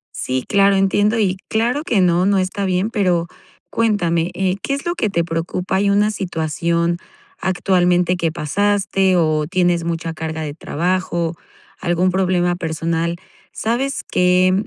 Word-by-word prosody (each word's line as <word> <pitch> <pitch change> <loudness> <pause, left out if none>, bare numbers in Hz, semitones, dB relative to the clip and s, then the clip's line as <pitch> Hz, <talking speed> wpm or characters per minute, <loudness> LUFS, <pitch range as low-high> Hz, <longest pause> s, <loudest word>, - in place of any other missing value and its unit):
Sí, 130 0 -2
claro, 200 -1 +4
entiendo. 205 +3 +2
Y 190 -3 +1
claro 240 +6 0
que 230 -10 +1
no, 180 0 +3
no 200 -1 +3
está 190 +2 -1
bien, 185 +4 0
pero 180 -7 +1 0.5
cuéntame, 175 -7 +1
eh, 190 0 0
¿qué 275 - -1
es 280 - -7
lo 345 - 0
que 220 - -1
te 170 -3 0
preocupa? 170 +3 -2
¿Hay 200 +1 +2
una 205 +1 +3
situación 170 -2 -1 0.4
actualmente 180 -1 +2
que 165 -2 -1
pasaste, 195 +3 +1
o 155 -2 +1
tienes 175 -1 +1
mucha 165 -1 -3
carga 160 0 -4
de 145 -2 -4
trabajo? 175 +1 -1 0.5
¿Algún 180 +1 +1
problema 180 -1 +1
personal? 165 0 -2 0.4
¿Sabes 250 +5 -1
qué, 180 0 +3
180 Hz, 145 wpm, -19 LUFS, 170-200 Hz, 0.5 s, claro